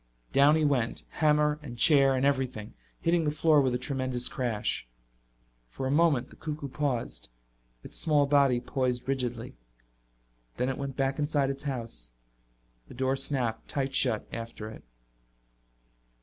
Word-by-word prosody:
Down 140 +2 +6
he 155 -1 +2
went, 125 -5 0
hammer 150 -1 +2
and 120 -5 -8
chair 135 -1 +5
and 130 +1 +1
everything, 130 -6 -1 0.3
hitting 170 0 +2
the 150 - +1
floor 155 0 +4
with 130 -2 +1
a - - +1
tremendous 130 -1 0
crash. 115 - -2 0.8
For 95 - -6
a 130 - 0
moment 145 -4 +2
the - - -11
cuckoo 150 -2 -5
paused, 130 - -3 0.5
its - - -8
small 150 -3 +3
body 140 -3 +3
poised 125 0 -2
rigidly. 125 -3 -2 1.0
Then 125 +2 0
it 135 - -3
went 140 -1 -5
back 135 +1 0
inside 145 -2 +1
its 140 +2 -9
house. 115 - -5 0.7
The - - -12
door 130 0 +1
snapped 125 -5 -1
tight 135 -1 -2
shut 120 -5 +1
after 115 -2 -6
it. - - -12
135 Hz, 150 wpm, -29 LUFS, 125-145 Hz, 1.0 s, Down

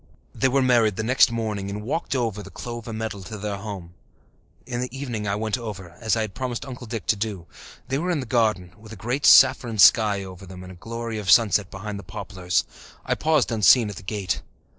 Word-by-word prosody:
They 135 - +1
were 135 +1 +2
married 115 -5 +3
the 110 - -3
next 125 +1 +4
morning 105 -4 -3
and 105 +1 -5
walked 140 +9 -3
together 125 -3 +1
over 105 -2 -4
the - - -10
clover 120 -1 -7
meadow 110 -2 -4
to 105 +4 -8
their 105 0 -4
home. 100 -4 -8 0.7
In 120 0 -4
the 125 - -3
evening 115 -7 -4
I 100 - 0
went 110 +3 -2
over, 100 -6 -7
as 110 -1 +1
I 110 - 0
had 110 -3 -4
promised 125 -3 -4
Uncle 125 -3 -8
Dick 110 -3 -5
to - - +2
do. 100 -4 -4 0.4
They 135 +2 -1
were 175 +3 -2
in 170 -4 0
the 130 - -4
garden, 110 -7 0
with 110 0 -14
a - - -7
great 120 +8 -1
saffron 115 -3 +6
sky 105 +1 +5
over 95 0 -10
them 90 0 -10
and 90 - -10
a - - -11
glory 115 +3 -5
of 100 -3 -5
sunset 105 -4 +4
behind 100 +1 -6
the - - -10
poplars. 90 -1 -2 0.4
I - - +1
paused 155 -5 +1
unseen 110 0 +5
at 100 - -10
the - - -8
gate. 95 -1 -3
110 Hz, 225 wpm, -24 LUFS, 100-120 Hz, 0.7 s, saffron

